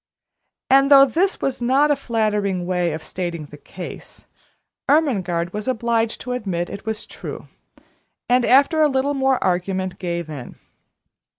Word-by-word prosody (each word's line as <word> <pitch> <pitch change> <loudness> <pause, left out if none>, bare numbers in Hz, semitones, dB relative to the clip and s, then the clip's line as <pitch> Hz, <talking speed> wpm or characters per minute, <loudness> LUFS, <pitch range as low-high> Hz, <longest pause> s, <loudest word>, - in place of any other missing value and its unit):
And 275 +1 +5
though 275 -1 +9
this 355 +9 0
was 265 -2 -2
not 270 +5 +3
a - - +4
flattering 210 -7 -1
way 180 -2 0
of 155 +1 -6
stating 170 -4 -5
the 145 0 -13
case, 180 +3 -10 0.6
Ermengarde 185 - +1
was 210 +2 -5
obliged 230 -2 0
to 250 - -5
admit 190 -8 -3
it 200 - -9
was 220 0 -3
true, - - -9 0.8
and, 250 0 +3
after 280 +6 +4
a 305 - +5
little 270 +1 0
more 265 -1 +2
argument, 185 0 -1
gave 170 -2 -3
in. 145 -6 -8
220 Hz, 150 wpm, -21 LUFS, 180-270 Hz, 0.8 s, though